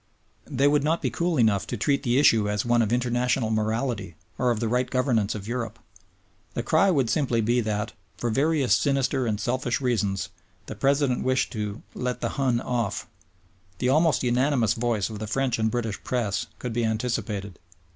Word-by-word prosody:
They 140 Hz, +3 st, +2 dB
would 145 Hz, -1 st, +3 dB
not 160 Hz, +3 st, 0 dB
be -, -, 0 dB
cool 170 Hz, -1 st, 0 dB
enough 110 Hz, -4 st, +2 dB
to -, -, -3 dB
treat 140 Hz, -2 st, +1 dB
the 125 Hz, -2 st, +1 dB
issue 110 Hz, -7 st, +4 dB
as 105 Hz, +1 st, -1 dB
one 120 Hz, 0 st, +3 dB
of 110 Hz, -1 st, 0 dB
international 120 Hz, -1 st, +1 dB
morality 110 Hz, -4 st, -1 dB, 0.2 s
or 125 Hz, -, +2 dB
of 115 Hz, -3 st, 0 dB
the 115 Hz, -, -1 dB
right 125 Hz, +2 st, 0 dB
governance 120 Hz, -6 st, +1 dB
of 100 Hz, -1 st, -7 dB
Europe. 115 Hz, -2 st, -3 dB, 0.8 s
The -, -, -1 dB
cry 195 Hz, -, +3 dB
would 140 Hz, -9 st, +2 dB
simply 120 Hz, 0 st, +1 dB
be 120 Hz, +3 st, +2 dB
that, 105 Hz, 0 st, -2 dB, 0.2 s
for 120 Hz, -, -1 dB
various 140 Hz, +1 st, +2 dB
sinister 135 Hz, -2 st, +1 dB
and 105 Hz, -2 st, -1 dB
selfish 120 Hz, +2 st, -1 dB
reasons, 105 Hz, -7 st, -1 dB, 0.4 s
the -, -, -6 dB
President 140 Hz, -2 st, +1 dB
wished 130 Hz, 0 st, +1 dB
"to 105 Hz, 0 st, -4 dB
let 125 Hz, 0 st, -3 dB
the -, -, -1 dB
Hun 130 Hz, -4 st, 0 dB
off." 115 Hz, -5 st, -2 dB, 0.7 s
The 125 Hz, -, 0 dB
almost 155 Hz, +2 st, +3 dB
unanimous 125 Hz, -2 st, +2 dB
voice 115 Hz, -3 st, -1 dB
of 105 Hz, -, -6 dB
the 110 Hz, -, -4 dB
French 125 Hz, +1 st, 0 dB
and 110 Hz, 0 st, +2 dB
British 115 Hz, -3 st, -3 dB
Press 115 Hz, -6 st, -1 dB
could 125 Hz, -2 st, -5 dB
be 120 Hz, +1 st, 0 dB
anticipated. 110 Hz, -3 st, -2 dB
120 Hz, 185 wpm, -25 LUFS, 110-130 Hz, 0.8 s, issue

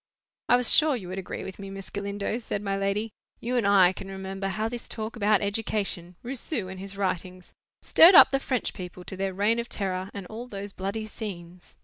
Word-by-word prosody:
"I -, -, +7 dB
was 245 Hz, -1 st, +5 dB
sure 305 Hz, -3 st, +6 dB
you 190 Hz, -7 st, -7 dB
would 190 Hz, +1 st, -4 dB
agree 190 Hz, -, -6 dB
with 190 Hz, +1 st, -8 dB
me, 195 Hz, -1 st, -7 dB
Miss 195 Hz, 0 st, -8 dB
Galindo," 200 Hz, +2 st, -3 dB
said 210 Hz, -3 st, -4 dB
my 195 Hz, -1 st, -1 dB
lady. 200 Hz, +3 st, -1 dB, 0.3 s
"You 245 Hz, +2 st, -2 dB
and 235 Hz, -5 st, +2 dB
I 190 Hz, -2 st, +6 dB
can 195 Hz, -, -8 dB
remember 195 Hz, 0 st, -5 dB
how 215 Hz, +3 st, -1 dB
this 240 Hz, +1 st, -7 dB
talk 220 Hz, +1 st, -5 dB
about 210 Hz, -2 st, +2 dB
education—Rousseau, 205 Hz, -, -2 dB
and 190 Hz, 0 st, -8 dB
his 195 Hz, +1 st, -6 dB
writings—stirred 185 Hz, -, +2 dB
up -, -, +9 dB
the 270 Hz, -, +2 dB
French 255 Hz, -3 st, -2 dB
people 180 Hz, -1 st, -8 dB
to 190 Hz, -, -7 dB
their 190 Hz, 0 st, -3 dB
Reign 210 Hz, +4 st, +2 dB
of 235 Hz, -, -4 dB
Terror, 190 Hz, -1 st, -2 dB
and 200 Hz, -2 st, -7 dB
all 225 Hz, +6 st, -8 dB
those 200 Hz, -3 st, -7 dB
bloody 200 Hz, +3 st, -4 dB
scenes." 180 Hz, -5 st, -8 dB
200 Hz, 205 wpm, -27 LUFS, 190-225 Hz, 0.3 s, up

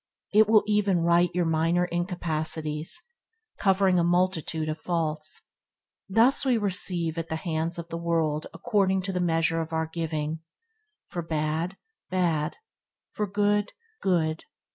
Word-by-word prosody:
It 215 Hz, 0 st, +6 dB
will 215 Hz, -1 st, +6 dB
even 205 Hz, -4 st, +2 dB
right 170 Hz, +1 st, +4 dB
your 180 Hz, -1 st, +2 dB
minor 165 Hz, +2 st, +2 dB
incapacitaties; 160 Hz, -3 st, 0 dB, 0.7 s
covering 190 Hz, -2 st, +3 dB
a -, -, +3 dB
multitude 170 Hz, -3 st, 0 dB
of 155 Hz, 0 st, -3 dB
faults. 155 Hz, -3 st, -3 dB, 0.6 s
Thus 230 Hz, +8 st, +5 dB
we 255 Hz, -3 st, +3 dB
receive 180 Hz, -5 st, -1 dB
at 165 Hz, 0 st, -5 dB
the 160 Hz, -, -1 dB
hands 160 Hz, 0 st, -2 dB
of 170 Hz, 0 st, -7 dB
the 165 Hz, -, -4 dB
world 160 Hz, -3 st, 0 dB
according 190 Hz, -2 st, +1 dB
to 195 Hz, -, -2 dB
the 180 Hz, -, -1 dB
measure 165 Hz, -1 st, +1 dB
of 160 Hz, 0 st, -6 dB
our 160 Hz, 0 st, 0 dB
giving. 160 Hz, -1 st, -3 dB, 0.7 s
For 175 Hz, -, -5 dB
bad, 160 Hz, +3 st, -2 dB, 0.3 s
bad; 170 Hz, -4 st, 0 dB, 0.5 s
for 210 Hz, -, -2 dB
good, 205 Hz, +1 st, +1 dB, 0.3 s
good. 160 Hz, -4 st, 0 dB
170 Hz, 140 wpm, -27 LUFS, 160-190 Hz, 0.7 s, It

